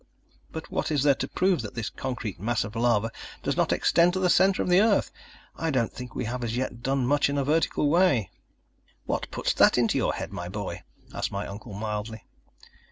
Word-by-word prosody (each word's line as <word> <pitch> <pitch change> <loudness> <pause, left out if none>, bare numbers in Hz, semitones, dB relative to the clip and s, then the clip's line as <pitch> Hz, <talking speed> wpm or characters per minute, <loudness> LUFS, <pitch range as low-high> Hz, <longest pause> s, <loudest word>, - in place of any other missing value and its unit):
"But 160 - -7
what - - -1
is 145 -3 +1
there 145 -1 +5
to 135 - -4
prove 185 -1 +1
that 105 -1 -8
this 115 -3 -3
concrete 125 -8 -5
mass 115 +4 0
of 105 +2 -8
lava 115 -1 +2 0.3
does - - 0
not - - +1
extend 170 +1 +3
to 185 - -1
the 180 -2 +3
centre 190 +2 +4
of - - -4
the 180 +1 +5
earth? 225 - +2 0.4
I 165 - -2
don't 125 -6 0
think 125 -2 -8
we 125 - -2
have 125 +2 -3
as 115 0 -2
yet 125 -2 -3
done 135 0 0
much 145 +2 +2
in 140 - -1
a 140 - +1
vertical 150 +1 +1
way." 150 - +3 0.7
"What - - -2
puts - - -1
that - - +5
into 120 -2 +2
your - - +1
head, - - -6
my 85 0 -5
boy?" 95 -3 -5 0.3
asked - - -2
my 100 +1 -3
uncle 105 +2 -8
mildly. 105 +1 -4
125 Hz, 215 wpm, -26 LUFS, 110-150 Hz, 0.7 s, there